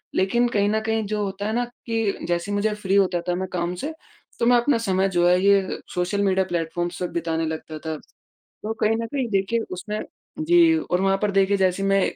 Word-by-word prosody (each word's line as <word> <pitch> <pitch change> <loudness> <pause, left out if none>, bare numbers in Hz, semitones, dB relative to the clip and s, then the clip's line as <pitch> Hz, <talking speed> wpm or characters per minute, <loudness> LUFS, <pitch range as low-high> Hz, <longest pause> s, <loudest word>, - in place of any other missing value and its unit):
लेकिन 235 +6 +2
कहीं 205 -2 +1
न 220 +1 +1
कहीं 220 0 0
जो 210 0 -1
होता 200 +1 -4
है 220 - -1
ना 245 0 +1
कि 225 -3 -3
जैसे 175 +3 -1
ही 205 - 0
मुझे 210 +1 +1
फ्री 200 -2 -1
होता 185 -3 +3
था 175 - +1
मैं 190 +1 -3
काम 175 0 -1
से, 295 - -4 0.5
तो 235 - +2
मैं 245 0 +6
अपना 240 +1 +2
समय 195 -3 +1
जो 175 -1 +2
है 180 +1 +4
ये 200 -1 +3 0.2
सोशल 180 +3 0
मीडिया 190 -1 +2
प्लेटफॉर्म्स 175 0 -3
पे 180 - 0
बिताने 165 -1 -1
लगता 155 0 -5
था। 160 -1 -4 0.5
तो 215 - -7
कहीं 225 +1 +3
न 230 - -3
कहीं 265 -1 -2
देखिए 195 +4 +1
उसमें 210 +4 -4 0.4
जी 335 0 +5
और 180 - -1
वहाँ 195 0 +3
पर 210 - +2
देखिए 195 0 +3
जैसे 190 0 +1
मैं 195 0 +3
195 Hz, 220 wpm, -23 LUFS, 180-220 Hz, 0.5 s, मैं